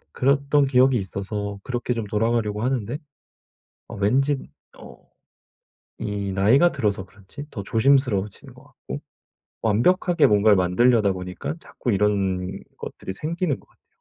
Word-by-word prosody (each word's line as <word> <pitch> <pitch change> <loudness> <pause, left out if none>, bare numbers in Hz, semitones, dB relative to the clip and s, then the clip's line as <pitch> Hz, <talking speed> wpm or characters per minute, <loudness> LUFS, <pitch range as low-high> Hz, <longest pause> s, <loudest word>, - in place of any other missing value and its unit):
그랬던 140 +1 +2
기억이 130 0 +4
있어서 100 +1 -4
그렇게 125 -1 -2
좀 115 -2 -3
돌아가려고 105 0 0
하는데 125 -1 -1 0.9
어 - - -8
왠지 135 +8 +2 0.4
어 - - -15 0.9
이 100 -1 -3
나이가 125 - +4
들어서 105 -7 -1
그런지 105 +10 -11
더 100 - -5
조심스러워지는 115 -3 +1
것 - - -16
같고 - - -9 0.6
완벽하게 170 - +3
뭔가를 105 0 +5
만드려다 100 +3 +3
보니깐 90 - -6
자꾸 120 - -4
이런 95 -2 0 0.2
것들이 95 - -7
생기는 155 - -2
것 - - -26
같아요. - - -34
110 Hz, 315 characters per minute, -23 LUFS, 100-135 Hz, 0.9 s, 뭔가를